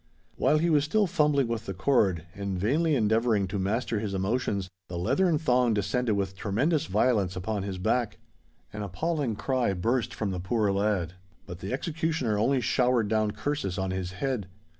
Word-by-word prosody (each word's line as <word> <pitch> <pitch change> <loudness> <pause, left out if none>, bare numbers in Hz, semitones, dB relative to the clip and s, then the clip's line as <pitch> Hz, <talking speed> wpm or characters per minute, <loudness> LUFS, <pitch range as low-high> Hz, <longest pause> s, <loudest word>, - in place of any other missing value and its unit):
While 155 - +3
he 165 +2 +2
was 145 -2 +4
still 205 +8 +2
fumbling 150 -7 +2
with 115 -2 -4
the 95 - -4
cord, 95 - +2
and 100 -2 -3
vainly 150 - +2
endeavouring 110 -3 +2
to 100 +1 -2
master 110 +3 -1
his 105 -2 -3
emotions, 100 -1 -1 0.2
the 90 - -5
leathern 145 - +2
thong 125 -6 +2
descended 105 +3 0
with 95 -1 -2
tremendous 125 - 0
violence 100 -2 +1
upon 100 +3 -2
his 95 -1 -4
back. 115 +5 0 0.6
An 105 - -5
appalling 130 - -2
cry 115 +1 0
burst 115 +7 0
from 105 -3 -3
the 90 - -3
poor 105 +3 +1
lad; 100 -4 0 0.3
but 90 0 -8
the 95 - -5
executioner 155 -4 -1
only 135 +4 +2
showered 120 -2 +2
down 110 -1 +2
curses 105 -3 -3
on 95 -1 -1
his 95 0 -3
head. 120 -1 -2
110 Hz, 175 wpm, -28 LUFS, 95-130 Hz, 0.6 s, was